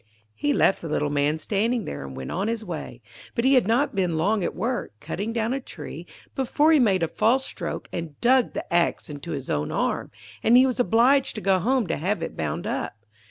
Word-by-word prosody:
He 130 +7 0
left 195 - +3
the 165 - -5
little 150 -1 0
Man 145 +2 +1
standing 220 +8 0
there, 70 - -5
and 65 -1 -8
went 65 - -5
on 195 +4 -1
his 225 -1 -2
way. 170 -4 -7 0.3
But 235 - 0
he 270 - +5
had 250 -7 +4
not 245 +6 +2
been 180 -5 0
long 200 +5 +1
at - - -2
work, 240 - -2
cutting 200 +8 -4
down 230 +1 -1
a 270 - -1
tree, 165 - -9 0.3
before 290 +4 +2
he 310 - +6
made 195 -8 +3
a - - +2
false 255 +10 +2
stroke, - - -5
and 165 -4 -5
dug 255 0 +3
the - - -4
axe 170 -2 +1
into 145 +3 -8
his 135 -3 -5
own 75 +1 -1
arm, - - -1 0.3
and 235 +2 +5
he 255 - +7
was 255 -1 -1
obliged 245 +3 +3
to 215 - -4
go 195 -1 +3
home 250 +5 +1
to 170 - -2
have 180 +2 -1
it - - -5
bound 75 -2 -3
up. - - -3
200 Hz, 225 wpm, -25 LUFS, 160-245 Hz, 0.3 s, he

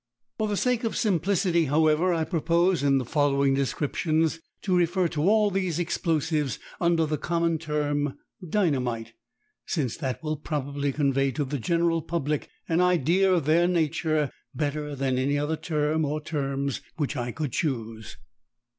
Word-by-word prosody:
For 215 - +1
the 205 -1 -1
sake 250 +1 +1
of 225 - -1
simplicity, 180 -3 +2
however, 155 +4 +3
I 165 -2 +1
propose 170 +1 +1
in 140 -1 +3
the 130 - -1
following 140 0 +2
descriptions 155 +4 0 0.2
to 185 -3 +1
refer 175 +1 +2
to 155 -3 -3
all 210 -1 +4
these 185 -4 -1
explosives 160 -4 0 0.2
under 170 -2 +2
the 150 -1 -2
common 170 -1 0
term 145 -2 -1 0.3
"dynamite," 125 - 0 0.5
since 140 -10 -1
that 130 -4 -4
will 155 0 -2
probably 145 -1 -2
convey 135 -1 +1
to 145 - -1
the 140 +1 -3
general 170 +4 +1
public 150 -2 -2 0.2
an 165 +1 +2
idea 180 +2 +3
of 170 -6 +2
their 165 +3 +4
nature 155 -3 +1 0.2
better 150 -1 -2
than 130 -1 0
any 140 +2 +1
other 145 +2 0
term 155 0 0
or 150 +1 -1
terms 140 -3 -2 0.2
which 145 -1 -1
I 120 -2 -2
could 145 +2 -3
choose. 115 -7 -3
155 Hz, 155 wpm, -26 LUFS, 140-170 Hz, 0.5 s, all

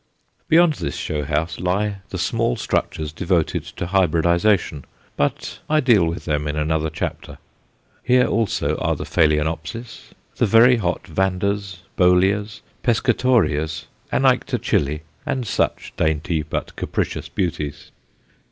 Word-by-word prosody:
Beyond 165 0 +5
this 70 - -4
show 75 -1 -3
house 75 +3 -2
lie 100 +3 0
the 95 - -5
small 60 -7 0
structures 75 -1 -2
devoted 85 -2 0
to - - -6
"hybridization," 85 -2 +2 0.3
but - - -2
I 155 0 +4
deal 115 - +4
with 85 +2 -4
them 75 -2 -1
in 75 - -2
another 80 +1 0
chapter. 80 - -5 0.6
Here 125 0 +4
also 115 -2 0
are - - 0
the - - -6
Phaloenopsis, 80 +9 -1 0.2
the - - +2
very 115 +4 +6
hot 90 -6 -1
Vandas, 95 0 -1 0.2
Bolleas, 95 +4 +2 0.2
Pescatoreas, 115 - +1 0.3
Anæctochili, 75 +2 +1 0.2
and 130 -2 -2
such 100 - -1
dainty 80 +1 0
but 75 - -5
capricious - - -3
beauties. 75 -5 -3
90 Hz, 120 wpm, -21 LUFS, 80-105 Hz, 0.6 s, very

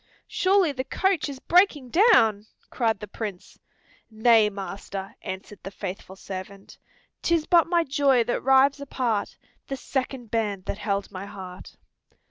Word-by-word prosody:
"Surely 380 -4 +2
the 260 -2 -4
coach 355 +4 0
is 275 - -6
breaking 315 -5 +3
down," 225 - +4 0.2
cried 225 -5 0
the 210 - -7
Prince. 200 -3 -7 0.5
"Nay, 220 -1 +4
master," 195 -1 -7
answered 190 +2 -7
the - - -7
faithful 190 -1 -7
servant, 195 +1 -9 0.5
"'Tis 335 -2 +1
but 345 -2 +4
my 340 -1 +2
joy 275 -4 +3
that 240 - -2
rives 270 +2 +4
apart 245 -6 -2 0.3
The 270 - -4
second 260 -3 -4
band 205 -5 -1
that 200 - -4
held 200 -1 -2
my 195 0 -7
heart." 185 -2 -10
225 Hz, 140 wpm, -25 LUFS, 200-280 Hz, 0.5 s, down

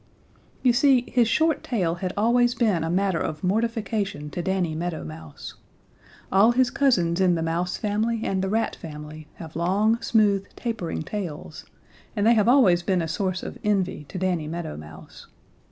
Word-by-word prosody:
You 250 -2 +5
see 260 0 +4
his 240 -3 +3
short 315 +6 +2
tail 185 -9 0
had 185 -1 -1
always 240 +3 +3
been 205 -9 +1
a 165 - -2
matter 185 -1 +1
of 155 -1 -4
mortification 205 - -1
to 175 - -3
Danny 185 -3 -1
Meadow 170 - -3
Mouse. 80 -1 -9 0.8
All 210 +5 +5
his 250 0 +2
cousins 185 -11 +2
in 180 -2 +4
the 165 - -2
Mouse 170 +2 -1
family 220 +2 -1
and 190 -1 -1
the 190 - -1
Rat 225 +3 0
family 150 -1 -9
have 160 -2 -10
long, 205 +7 +1
smooth, 205 -3 +2
tapering 220 -10 -3
tails, 160 - -6 0.5
and 205 - 0
they 230 - +6
have 215 -2 +3
always 215 -10 +5
been 180 -1 0
a - - -3
source 185 +1 -2
of - - -7
envy 190 -6 0
to 185 - -8
Danny 180 -4 -1
Meadow 165 - -5
Mouse. 75 +1 -12
190 Hz, 170 wpm, -24 LUFS, 165-225 Hz, 0.8 s, they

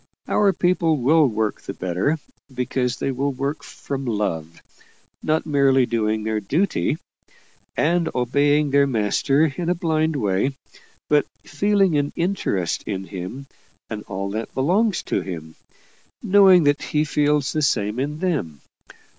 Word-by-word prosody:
Our 205 -1 +3
people 175 -3 +1
will 150 +4 +4
work 110 -2 -2
the - - -7
better, 95 - -1 0.3
because 125 0 -1
they 135 - -1
will 140 +2 -1
work 140 +3 -3
from 140 -1 -6
love. 85 -8 -3 0.6
Not 155 +1 0
merely 135 -3 +3
doing 110 -2 -1
their 110 0 -1
duty, 150 - 0 0.8
and 170 +2 +2
obeying 145 +4 +2
their 140 0 +4
master 135 +6 +1
in 175 -1 -2
a 180 - +2
blind 160 -2 0
way, 110 +3 0 0.5
but 150 -1 +3 0.2
feeling 195 -1 +2
an 145 0 -2
interest 165 - -1
in 95 -2 -3
him 95 +9 -7 0.5
and 105 -1 -4
all 100 0 -4
that 110 +2 -4
belongs 185 - +1
to - - -1
him; 80 -4 -7 0.7
knowing 195 -4 +6
that 145 0 +2
he 150 0 0
feels 150 -2 +1
the 155 - 0
same 110 -5 0
in 145 +3 -2
them. 145 - -2
140 Hz, 140 wpm, -22 LUFS, 110-155 Hz, 0.8 s, knowing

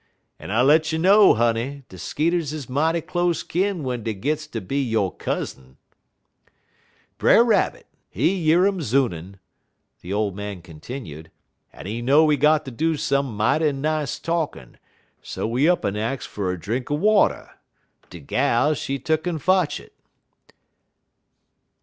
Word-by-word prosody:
'_ - - -41 0.4
en - - -8
I 115 +5 +2
let 155 +3 +4
you 160 - -1
know, 195 +4 +6
honey, 120 +5 -1
de - - -14
skeeters 165 - -1
is 150 -4 -6
mighty 160 +5 0
close 175 0 -1
kin 185 -1 -1
w'en 125 -2 -3
dey 110 0 -3
gits 150 +9 -2
ter 120 - -5
be 135 +8 -2
yo' 110 -7 0
cousin. 65 -1 -5 1.4
"Brer 230 - +6
Rabbit, 225 -4 +1 0.2
he - - +1
year 175 0 +3
um 195 -2 -1
zoonin'," 100 - -1 0.6
the 90 - -8
old 100 -2 -1
man 100 -3 -6
continued, 80 - -9 0.4
"en - - -12
he 110 +4 -4
know 145 +6 +4
he 150 - +4
got 155 +2 +3
ter 135 - -7
do 160 +6 -1
some 140 -5 -1
mighty 150 +8 +2
nice 150 0 -2
talkin', 160 - -4 0.4
so 115 - -4
he 140 +7 +3
up'n 105 - 0
ax 115 +6 -3
fer 95 -3 -3
drink 115 - -4
er 145 - +1
water. 210 +6 +2 0.6
De 85 - -10
gal, 120 - +1
she 140 -1 -3
tuck'n 160 +5 -1
fotch 180 -2 +1
it. - - -17
140 Hz, 150 wpm, -23 LUFS, 110-160 Hz, 1.4 s, know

